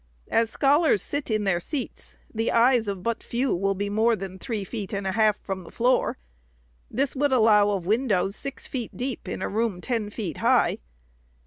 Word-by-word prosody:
As 225 -1 +3
scholars 285 -2 +3
sit 285 -2 -3
in 215 -1 +1
their 190 -3 +1
seats, 265 - -5 0.2
the 225 +1 0
eyes 235 -1 +4
of 195 -2 -4
but 230 -1 -1
few 250 0 -1
will 195 +2 0
be 205 +2 -2
more 220 +3 +2
than 190 -2 -7
three 220 -3 -3
feet 205 +1 -6
and 200 0 -2
a 190 - 0
half 215 0 +3
from 190 -2 -4
the - - -12
floor. 250 +2 +1 0.7
This 275 +4 -1
would 285 +1 +1
allow 215 -4 +5
of 195 -4 -1
windows 205 -2 +1
six 275 +3 -5
feet 245 -4 -5
deep 255 0 -4
in - - -4
a - - 0
room 215 -3 -1
ten 225 0 -2
feet 200 - -5
high. - - +3
220 Hz, 195 wpm, -25 LUFS, 200-245 Hz, 0.7 s, allow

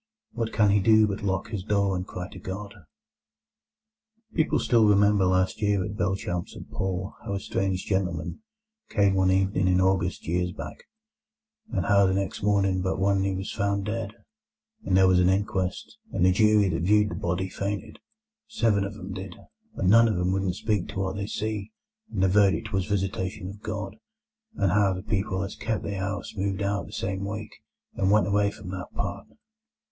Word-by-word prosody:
What 115 -1 -3
can 105 -2 +3
he 100 - +4
do 110 +2 +5
but 100 0 -3
lock 95 +1 -1
his 105 -5 -4
door 100 -2 +1
and 90 +1 -4
cry 90 0 -6
to 95 - -11
God? 100 +3 -6 1.6
People 155 -1 +2
still 115 -3 +4
remembered 100 -1 +4
last 95 +2 +1
year 100 -3 +2
at 105 - -5
Belchamp 95 -4 -2
St - - -10
Paul 95 +1 -3
how 100 -3 -3
a - - -1
strange 95 -1 -2
gentleman 90 - -2 0.5
came 100 -2 +3
one 95 -1 +3
evening 95 0 +2
in 90 0 +3
August 95 -1 +1
years 90 +1 0
back; - - -8 0.9
and - - -1
how 100 -1 +5
the 95 - +1
next 100 -1 -2
morning 100 -2 +2
but 95 0 -1
one 95 0 +2
he 95 -1 0
was 95 +1 -4
found 100 0 0
dead, 105 -1 -3 0.7
and 95 - +2
there 95 0 +6
was 90 -1 +4
an 90 0 +4
inquest; 95 - -1
and 90 - +2
the 95 - +6
jury 105 +1 +4
that 80 -3 -1
viewed 105 +3 +3
the - - -5
body 90 +2 -2
fainted, 100 +1 -4 0.5
seven 115 - +1
of 100 +1 -5
'em 95 -1 -7
did, 95 -2 -7 0.4
and - - -1
none 115 +1 +7
of 110 - 0
'em 90 +1 +1
wouldn't 95 -2 0
speak 105 -2 -1
to - - -5
what 95 -1 -1
they 100 0 -3
see, 110 -1 -3 0.4
and 95 -4 0
the - - +5
verdict 105 +3 +2
was 95 -1 +1
visitation 95 0 -2
of 100 +1 -11
God; 105 -1 -5 0.6
and 95 - +1
how 100 0 +3
the 90 - -6
people 100 -2 -1
as 100 - -5
kep' 110 -2 -2
the 100 -1 -3
'ouse 100 +1 -4
moved 100 0 -1
out 100 +1 -1
that - - -12
same 95 0 -3
week, 105 +1 -5 0.4
and 95 - 0
went 105 +1 +4
away 100 0 +2
from 100 -2 -9
that 90 -1 -6
part. 100 +1 -4
100 Hz, 195 wpm, -26 LUFS, 95-105 Hz, 1.6 s, none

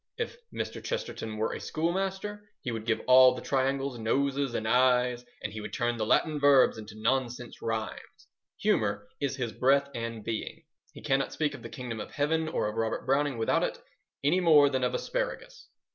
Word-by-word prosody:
If 460 - -3 0.2
Mr. - - -5
Chesterton 465 - -4
were 110 - -1
a - - -5
schoolmaster 195 +5 -2
he 125 - -2
would 115 -1 -5
give 110 - +1
all 130 0 +7
the - - -6
triangles 135 -1 0
noses 135 +3 0
and 110 - -2
eyes, 125 0 +3 0.2
and - - -4
he 110 - -5
would - - -7
turn 120 -1 0
the 110 -1 -1
Latin 155 +4 +2
verbs 140 -5 +5
into 110 0 -10
nonsense 120 +1 -1
rhymes. 110 -1 -5 0.4
Humour 100 0 +1
is 140 -2 -1
his 125 -4 -3
breath 140 +3 +3
and 115 -2 -5
being. 110 0 -5 0.3
He - - -13
cannot 135 0 +1
speak 150 -2 0
of - - -9
the - - -8
Kingdom 125 -5 -6
of - - -6
Heaven 160 +2 0
or 155 - -1
of 105 +1 -5
Robert 115 0 -1
Browning 140 -1 +1
without 110 - +2
it - - -1 0.5
any 155 +6 +3
more 150 -5 +6
than 130 -1 0
of 125 - +1
asparagus. - - -4
130 Hz, 190 wpm, -29 LUFS, 115-150 Hz, 0.5 s, all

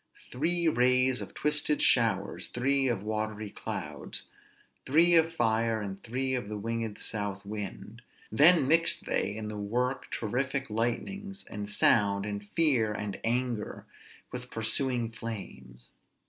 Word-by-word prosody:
"_Three 170 +6 +1
rays 125 +1 +3
of - - -9
twisted 150 0 +1
showers, 110 -5 +2
three 135 +2 +1
of 115 -6 -1
watery 110 -1 -3
clouds, - - -5 0.6
three 165 +5 +5
of 165 -1 +5
fire, 115 -6 +1
and 100 -2 -6
three 130 +3 -2
of 125 -5 -2
the 105 - -4
winged 115 0 -3
south 100 -2 -3
wind; 105 +2 -7 0.3
then 150 +5 +6
mixed 165 +3 +3
they 100 - -1
in 110 -1 -5
the 105 -1 -5
work 125 +6 -2
terrific 130 +3 -2
lightnings, 195 - -2
and 105 0 -5
sound, 100 -1 +3
and 100 -1 -4
fear, 130 -9 +4
and 105 -1 -4
anger, 120 -2 -2 0.5
with 125 0 -6
pursuing 115 +1 -1
flames. 65 - -8
115 Hz, 135 wpm, -29 LUFS, 105-130 Hz, 0.6 s, then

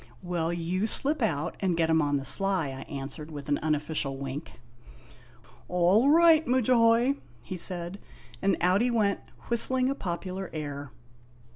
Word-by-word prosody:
"Well, 170 -2 -1
you 175 +4 -1
slip 285 +6 +2
out 155 -10 -1
and 180 -4 0
get 165 -1 +2
him 160 0 +4
on 145 -1 +1
the 135 - -5
sly," 185 +1 +1
I 135 +3 -9
answered 140 +2 -6
with 145 -2 -8
an 145 - +1
unofficial 150 -2 -1
wink. 140 +3 -6 1.1
"All 180 +9 +3
right, 325 0 +6
Mudjahoy," 245 +1 +3 0.3
he 185 - -6
said, 175 +1 0 0.4
and 195 -2 +2
out 185 +4 +3
he 245 - +2
went 215 -4 +1 0.3
whistling 255 +2 +1
a - - +1
popular 185 -4 -5
air. 145 -3 -6
180 Hz, 150 wpm, -28 LUFS, 150-230 Hz, 1.1 s, right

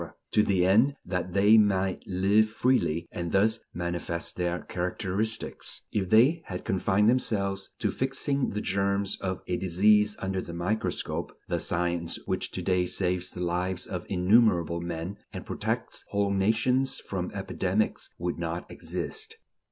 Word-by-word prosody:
to 105 - +4
the 95 -4 +2
end 115 +9 +4
that 90 0 -3
they 105 +3 +6
"might 95 -3 +2
live 100 +4 +3
freely" 110 -9 +1
and 85 -1 -4
thus 110 +4 +3
manifest 85 0 -3
their 90 -1 -1
characteristics; 95 +5 -2
if 95 -3 -1
they 130 +10 +5
had 90 -1 -6
confined 95 +2 +2
themselves 100 -5 +1
to 105 -4 0
fixing 135 +2 0
the 105 - -3
germs 100 0 0
of 95 -1 -3
a 90 - -1
disease 105 +3 +3
under 95 0 -2
the 85 - -8
microscope, 95 +6 -2 0.2
the - - 0
science 85 -1 -1
which - - -2
to 90 - -5
day 90 0 +2
saves 90 -1 0
the 90 - -6
lives 90 +1 -1
of 90 -2 -5
innumerable 90 -3 +3
men 85 +3 -4
and - - -7
protects - - -2
whole 100 -1 +1
nations 110 +7 +2
from - - -4
epidemics - - -1
would - - -3
not - - -3
exist. 440 +1 -5
95 Hz, 145 wpm, -28 LUFS, 90-110 Hz, 0.2 s, they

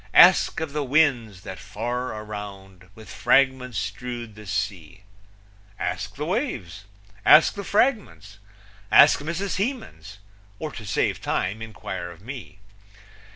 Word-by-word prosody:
Ask - - +7
of 155 -3 -4
the 150 -1 -1
winds, 125 -9 +2
that 95 -2 -8
far 120 +4 -4
around 100 -3 -9
With 110 -1 -13
fragments 130 -4 +2
strewed 120 +2 -5
the 105 0 -12
sea 95 -2 -4 0.7
Ask 90 +1 -4
the 150 - -4
waves. 175 - -3 0.4
Ask - - +7
the 200 - -6
fragments. 205 - 0 0.5
Ask - - +7
Mrs. 170 +6 -3
Hemans. 210 - -4 0.4
Or, 155 +5 -5
to 110 -6 -9
save - - 0
time, 100 +5 -2
inquire 95 -5 -6
of 85 +1 -13
me. 125 -6 -9
110 Hz, 125 wpm, -24 LUFS, 95-145 Hz, 0.7 s, Ask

